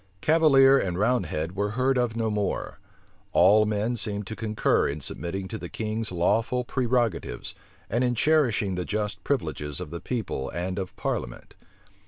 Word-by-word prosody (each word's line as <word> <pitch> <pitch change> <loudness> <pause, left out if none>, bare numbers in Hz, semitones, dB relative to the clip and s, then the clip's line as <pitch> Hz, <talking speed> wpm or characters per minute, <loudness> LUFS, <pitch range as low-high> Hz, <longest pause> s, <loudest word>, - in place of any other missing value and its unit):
Cavalier 140 - +5
and 90 -6 -2
roundhead 95 -6 0
were 100 +1 0
heard 130 +1 +2
of 120 -3 0
no 110 -1 0
more: 105 -1 -2 0.5
all 105 +4 +6
men 105 +3 0
seemed 105 -2 -3
to 110 - -6
concur 110 -1 +1
in 70 +2 -3
submitting 90 +6 -5
to 110 - -5
the - - -7
king's 110 0 -3
lawful 110 +8 +1
prerogatives, 120 - -1 0.3
and 120 +4 0
in 125 -1 +1
cherishing 120 -9 +2
he 90 - -2
just 105 -1 -3
privileges 75 - -2
of - - -7
the 85 - -6
people 110 - -3
and 90 +3 -3
of 95 -1 -5
parliament. - - -4
110 Hz, 160 wpm, -26 LUFS, 95-125 Hz, 0.5 s, all